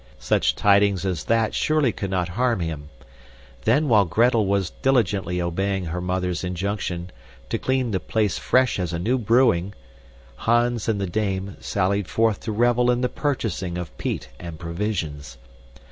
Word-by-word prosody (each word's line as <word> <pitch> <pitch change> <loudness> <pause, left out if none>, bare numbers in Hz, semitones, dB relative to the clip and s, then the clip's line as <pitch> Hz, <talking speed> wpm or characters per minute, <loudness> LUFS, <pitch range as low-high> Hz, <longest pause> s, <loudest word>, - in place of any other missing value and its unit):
Such - - +1
tidings 100 -1 +3
as 90 -5 -2
that 115 -1 +1
surely 155 -5 +2
could 100 - -5
not 90 -2 -1
harm 120 +3 0
him. 80 -3 -4 0.8
Then 150 +1 +3
while 110 -5 +5
Gretel 115 +4 +2
was 100 -2 0
diligently 100 -9 +1
obeying 95 +2 -1
her 85 +2 -3
mother's 90 -1 -2
injunction 90 -1 -3 0.4
to - - -1
"clean 130 -2 0
the 95 - 0
place 110 +1 -1
fresh 130 -4 +2
as 90 -2 -2
a - - -1
new 120 +10 0
brewing," 105 -5 +2 0.6
Hans 120 -1 +1
and 105 -3 0
the 100 - -1
dame 95 0 -2
sallied 100 0 0
forth 110 -2 +1
to 110 - -4
revel 120 +2 +2
in 125 0 +2
the 125 - +1
purchasing 110 - -2
of 90 -3 -6
peat - - -3
and 85 -2 -7
provisions. 85 -4 -4
100 Hz, 160 wpm, -23 LUFS, 90-115 Hz, 0.8 s, while